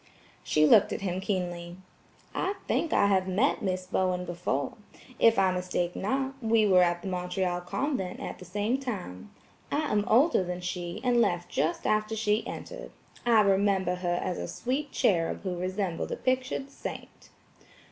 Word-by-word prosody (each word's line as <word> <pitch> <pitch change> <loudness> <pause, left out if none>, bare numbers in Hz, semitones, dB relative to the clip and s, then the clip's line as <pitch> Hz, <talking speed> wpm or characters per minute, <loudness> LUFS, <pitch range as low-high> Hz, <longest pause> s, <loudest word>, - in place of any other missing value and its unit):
She 155 0 +3
looked 205 +6 +6
at - - -3
him 185 -1 -2
keenly. 175 -3 -3 0.6
"I 385 +2 -1
think 330 - 0
I - - +4
have 190 -2 +2
met 205 +10 +1
Miss 185 -2 -2
Bowen 185 -1 0
before. 170 -6 -2 0.5
If 230 0 +5
I 190 -1 +4
mistake 180 -1 -2
not, 265 +6 -1
we 225 -1 +3
were 185 -2 +6
at 175 -1 +1
the - - -5
Montreal 180 0 -1
convent 195 -2 -2
at - - -6
the 185 - -10
same 210 +8 -1
time. 205 - -6 0.4
I 300 +1 0
am 210 -1 +2
older 260 - +4
than 180 0 -4
she, 180 +2 -4
and 245 -2 +3
left 175 -5 0
just 155 +5 -1
after 215 +1 +1
she 215 0 0
entered. - - -7 0.4
I 230 -2 +6
remember 195 -2 +2
her 175 -1 -1
as 180 - -2
a - - -4
sweet 275 +4 -3
cherub 175 -10 +1
who 185 -2 -2
resembled 185 -1 -2
a - - 0
pictured 260 +1 -1
saint." - - -8
190 Hz, 165 wpm, -28 LUFS, 180-225 Hz, 0.6 s, looked